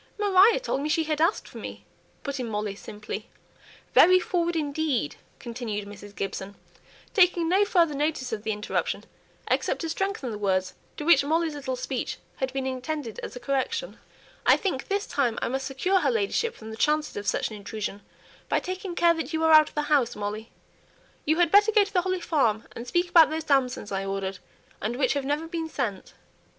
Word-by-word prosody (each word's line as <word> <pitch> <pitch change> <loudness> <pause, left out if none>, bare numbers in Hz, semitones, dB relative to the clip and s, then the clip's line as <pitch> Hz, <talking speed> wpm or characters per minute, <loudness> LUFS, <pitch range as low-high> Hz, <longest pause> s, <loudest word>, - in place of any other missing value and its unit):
"Maria 410 +2 +5
told 380 - -2
me 300 - -2
she 320 +1 +2
had 305 -1 -1
asked 335 +6 +2
for - - -10
me," - - -8 0.4
put 280 -1 -4
in 245 -2 -3
Molly, 210 -1 -2
simply. 210 +1 -7 0.6
"Very 370 +1 +7
forward 345 -1 -1
indeed!" 290 - -1 0.2
continued 225 -4 -5
Mrs. 205 0 -11
Gibson, 195 0 -4 0.6
taking 355 -4 +4
no 385 +4 +4
further 340 -6 +3
notice 285 -4 -1
of 215 - -3
the 220 +1 -2
interruption, 210 0 -2 0.4
except - - 0
to 330 - -3
strengthen 390 - -2
the 210 - -5
words 185 -2 0 0.2
to - - -4
which 310 -4 +6
Molly's 320 +2 +1
little 265 -3 -3
speech 255 0 -3 0.2
had 265 -1 -2
been 265 0 -3
intended 260 -1 -4
as - - -7
a - - -6
correction. 275 - -2 0.4
"I - - +6
think 360 -10 -2
this 400 +1 -1
time 245 -5 0
I - - -1
must 265 +1 -2
secure 360 +8 +1
her - - +1
ladyship 455 +1 0
from 220 0 -10
the 220 - -8
chances 300 +4 +1
of 205 0 -5
such - - 0
an - - -6
intrusion, 205 0 -5 0.5
by - - +2
taking 370 -1 -5
care 340 -1 +5
that 325 -2 -4
you 320 0 0
are 320 - +4
out 310 -1 +8
of - - -24
the 300 - 0
house, 285 -5 +2
Molly. 210 +2 -4 0.8
You 315 +2 +2
had 345 -2 +3
better 410 +2 +6
go 425 -1 +5
to 400 +1 -8
the 360 - +3
Holly 370 0 -2
Farm, 230 -11 +1
and 235 +1 -7
speak 350 +7 +1
about 330 -3 +7
those 315 +1 -3
damsons 260 -8 +1
I 195 0 -1
ordered, 195 -1 -3 0.4
and 225 +4 -2
which 260 0 +2
have 280 -2 -2
never 295 +3 -1
been 325 -1 -4
sent." 200 -10 -4
285 Hz, 200 wpm, -26 LUFS, 225-340 Hz, 0.8 s, out